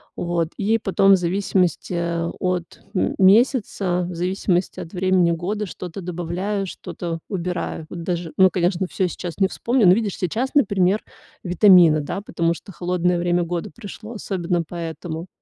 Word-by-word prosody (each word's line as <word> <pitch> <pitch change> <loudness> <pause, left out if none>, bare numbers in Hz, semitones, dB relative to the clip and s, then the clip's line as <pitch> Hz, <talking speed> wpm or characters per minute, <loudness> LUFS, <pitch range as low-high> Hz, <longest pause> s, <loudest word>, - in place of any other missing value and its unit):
Вот, 170 -2 -1
и 220 +2 +2
потом, 195 0 +4
в - - +8
зависимости 180 -1 0
от 170 +1 -2
м 185 - 0
месяца, 195 -3 +3
в 175 - -6
зависимости 180 +1 -1
от 165 - -9
времени 185 -2 +2
года, 200 +6 -2
что-то 180 +1 -7
добавляю, 180 +4 -3
что-то 170 -2 -6
убираю. 180 -4 -3
Вот 170 -1 -7
даже, 175 -2 -3
ну, 190 -1 +6
конечно, 180 +1 0
всё 185 - 0
сейчас 175 0 -6
не 195 -1 +3
вспомню. 235 -1 +1
Но 180 - +8
видишь, 210 -2 -1
сейчас, 225 +9 -1
например, 200 -6 +3 0.4
витамины, 175 -4 +6
да, 165 +7 -4
потому 170 -4 0
что 185 +2 -11
холодное 180 +2 0
время 175 0 +1
года 175 +4 -4
пришло, 220 0 -9
особенно 180 -5 -2
поэтому. 165 0 -6
180 Hz, 150 wpm, -22 LUFS, 170-195 Hz, 0.4 s, в